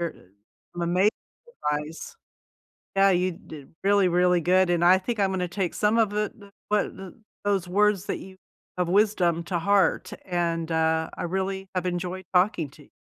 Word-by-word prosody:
You're 170 -1 -2 0.6
amazing 175 +4 +2 0.6
advice. 150 - -5 0.8
Yeah, 195 0 +5
you 180 0 +2
did 155 -3 -13
really, 200 -1 +4
really 180 0 +3
good. 180 +2 +3
And 175 -1 +2
I 185 +1 +7
think 220 +3 -4
I'm 195 -1 +2
gonna 180 -1 -1
take 185 -2 -2
some 210 +2 +1
of 220 -3 +3
the 210 0 -1
the 200 -2 -15 0.2
what 210 -1 0
th 190 -1 -9 0.3
those 195 -3 0
words 205 +1 +2
that - - -3
you 190 0 -12 0.4
of 180 -1 0
wisdom 180 -4 +2
to 175 -2 -1
heart, 195 -1 +2
and, 170 -2 -1
uh, 160 0 +1
I - - -4
really 190 +2 -2
have 185 0 -1
enjoyed 180 +1 -3
talking 180 -5 +2
to 145 +1 -17
you. - - -24
180 Hz, 175 wpm, -25 LUFS, 170-195 Hz, 0.8 s, I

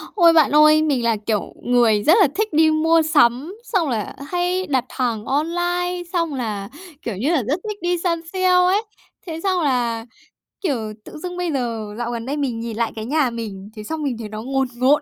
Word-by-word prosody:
Ôi! 340 -4 +6
Bạn 315 -4 +5
ơi, 305 +1 +7
mình 285 -6 +1
là 230 -1 +2
kiểu 215 -3 -1
người 235 -4 +3
rất 320 - +6
là - - +6
thích 430 0 -1
đi 315 +1 +5
mua 325 +1 +3
sắm, 300 +1 +2
xong 370 - 0
là 220 -4 -3
hay 360 +2 -1
đặt 260 -4 0
hàng 235 -5 -2
online, 350 +4 -1
xong 335 -4 0
là, 215 -6 -4 0.3
kiểu 230 - -4
như 250 +10 0
là, 310 -7 +2
rất 280 - -1
thích 410 -1 -6
đi 350 0 0
săn 335 -1 -1
sale 370 -1 +1
ấy. 365 +3 +4 0.5
Thế 325 -1 -5
xong 375 -2 +1
là, 240 -6 0 0.6
kiểu, 240 - -2
tự - - -10
dưng 355 +3 -6
bây 355 -2 -1
giờ 225 -5 -3
dạo 240 0 -3
gần 230 -1 -4
đây 280 +3 -3
mình 260 -6 -2
nhìn 230 -1 -5
lại 230 -1 0
cái 220 -1 -5
nhà 285 +1 +1
mình, 210 -4 -7
thế 215 - -7
xong 310 +7 -4
mình 265 -5 -2
thấy 215 - -6
nó 215 +1 -6
ngồn 270 +2 0
ngộn 265 +5 +3
285 Hz, 215 wpm, -21 LUFS, 235-340 Hz, 0.6 s, ơi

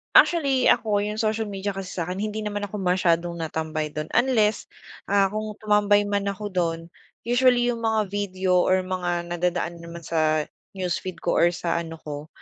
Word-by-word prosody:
Actually, 275 -7 +5
ako 210 -2 +3
yung 210 +1 -2
social 220 0 0
media 200 0 -3
kasi 195 -1 -6
sakin 180 +2 -3
hindi 215 +1 -3
naman 205 -1 -3
ako 210 - -8
masyadong 175 -3 +1
natambay 155 -1 -2
dun 150 +1 -6
unless, 220 -4 +2 0.4
ah, 195 -1 +3
kung 215 0 -4
tumambay 210 -1 +3
man 205 0 -1
ako 205 +1 -4
dun 165 -2 -2 0.3
usually 245 0 +3
yung 235 - -4
mga 220 -3 0
video 190 -2 +1
or 185 +1 +3
mga 175 -2 -2
nadadaan 175 0 -1
naman 170 0 -9
sa 155 -1 +1 0.3
newsfeed 185 -1 -3
ko - - +1
or 170 - +6
sa 170 -1 -1
ano 165 -1 -6
ko 150 0 -6
190 Hz, 170 wpm, -24 LUFS, 170-210 Hz, 0.4 s, or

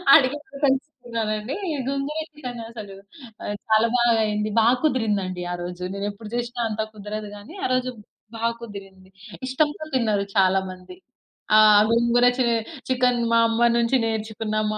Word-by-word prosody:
అడిగి 280 -2 +4
మరి 275 0 -12
తెలుసుకున్నానండి. 240 -4 -2 0.3
గోంగుర 275 +2 -2
చికెనసలు 230 -8 -8 0.5
ఆహ్, 205 - -3
చాలా 220 +1 +5
బాగా 240 -1 +4
అయింది. 210 0 -1
బాగా 235 +3 +5
కుదిరింది 225 -8 +1
అండి 180 -1 -5
ఆరోజు. 175 0 -6
నేను 200 0 -3
ఎప్పుడు 210 +1 -11
చేసినా 240 0 -3
అంత 220 0 -2
కుదరదు 210 0 -6
గానీ, 205 +10 -12
ఆ - - +3
రోజు 255 0 +1 0.5
బాగా 230 +1 0
కుదిరింది. 195 -4 -10 0.4
ఇష్టంతో 295 +4 0
తిన్నారు 215 -5 +1
చాలా 190 0 +4
మంది. 185 - -12 0.6
ఆహ్, 215 -1 +8
గోంగూర 235 +1 +3
చే 260 - +2 0.4
చికెన్ 250 -1 +2
మా 230 - +5
అమ్మ 225 +1 -1 0.2
నుంచి 235 +2 +2
నేర్చుకున్న, 220 -1 -3 0.2
మా 215 - -3
225 Hz, 145 wpm, -24 LUFS, 210-250 Hz, 0.6 s, ఆహ్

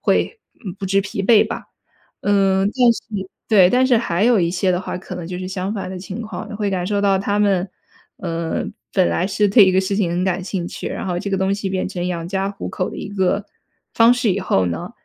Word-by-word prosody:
会， 455 - 0 0.2
嗯， 185 -3 -5
不 195 - -5
知 195 +1 +2
疲 195 0 -4
惫 215 +1 +5
吧。 - - -6 0.6
嗯， 195 -1 +3
但 245 -3 +5
是 205 -4 -6 0.2
对， 195 -5 +6
但 255 +1 +4
是 250 -3 +4
还 190 -3 0
有 240 -2 +4
一 170 - +2
些 185 +1 0
的 180 - 0
话， 185 - -5
可 - - -8
能 175 - -6
就 180 +1 -5
是 185 0 -5
相 190 +2 -3
反 195 -2 -4
的 185 - -6
情 200 +4 -6
况 215 -1 -7
的。 210 - -6
会 205 -1 -1
感 180 -2 -1
受 205 0 0
到 200 -1 +3
他 200 +1 -1
们， 195 -2 +2 0.5
呃， 165 -2 -2 0.3
本 - - +4
来 85 - 0
是 205 +1 +1
对 205 +1 +7
一 185 - +3
个 190 - +4
事 195 +1 -2
情 195 -5 +1
很 175 +1 -1
感 185 0 0
兴 180 -2 -3
趣， - - -7
然 - - -5
后 180 -2 -1
这 200 - -4
个 195 - +1
东 190 +1 +1
西 200 -1 -3
变 185 -1 -1
成 175 -1 -4
养 170 -2 -3
家 195 +1 -1
糊 200 - -6
口 185 - -2
的 - - -8
一 - - -6
个 200 0 0 0.5
方 230 +1 +6
式 245 -5 +1
以 190 - -1
后 95 - +1
呢， 85 -1 -4
195 Hz, 270 characters per minute, -20 LUFS, 180-205 Hz, 0.6 s, 对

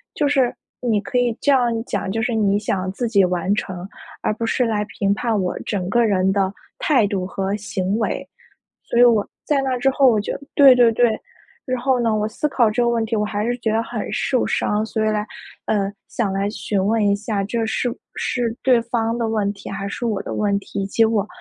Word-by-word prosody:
就 295 - +1
是 265 -4 +2 0.3
你 225 -4 +1
可 250 - -9
以 240 -2 +1
这 285 - +2
样 245 -3 +3
讲， 190 - -3
就 225 +1 -1
是 245 - 0
你 205 -2 +2
想 190 -3 -2
自 235 +4 -2
己 200 -4 +4
完 180 +2 +1
成， 185 -3 -4 0.4
而 - - +1
不 230 +2 -3
是 250 - +1
来 210 -2 0 0.2
评 200 0 +2
判 220 -1 0
我 180 - -2
整 185 -4 -3
个 240 0 +4
人 190 -2 +2
的 195 -1 +1 0.3
态 255 -9 +3
度 190 -2 -2
和 195 +1 -2
行 205 -1 -2
为。 - - -2 0.6
所 235 - -1
以 - - +7
我， 225 -4 +4 0.2
在 285 -2 +2
那 260 -1 0
之 270 +2 +2
后， 270 0 +3
我 215 -2 +2
就 - - -3 0.2
对 275 -3 +8
对 240 -2 +5
对， 235 -1 +2 0.5
然 255 -1 -1
后 260 -1 +2
呢， 225 -2 +1
我 215 0 0
思 240 +7 -2
考 240 -5 +3
这 245 +3 0
个 235 - +2
问 230 -1 +1
题， 225 0 -1
我 210 - +1
还 210 0 -2
是 245 0 0
觉 220 -2 -1
得 225 +1 +1
很 230 -2 -5
受 255 -3 0
伤。 210 +1 0
所 220 -1 -1
以 - - +3
来， 210 0 -1 0.4
呃 200 -2 0 0.2
想 215 -5 -1
来 195 +1 0
询 200 -3 -2
问 215 0 +2
一 200 - +3
下 205 -1 -2
这 225 +2 -1
是 245 +2 -1
不 - - -7 0.2
是 235 -2 -1
对 250 -2 +4
方 230 -1 -1
的 230 -1 0
问 210 -2 0
题 195 - -9
还 200 0 -4
是 240 - -5
我 210 -3 -1
的 - - -5
问 200 -1 +1
题， 200 0 -5
结 225 +3 +3
果 210 -2 0
220 Hz, 250 characters per minute, -21 LUFS, 200-240 Hz, 0.6 s, 对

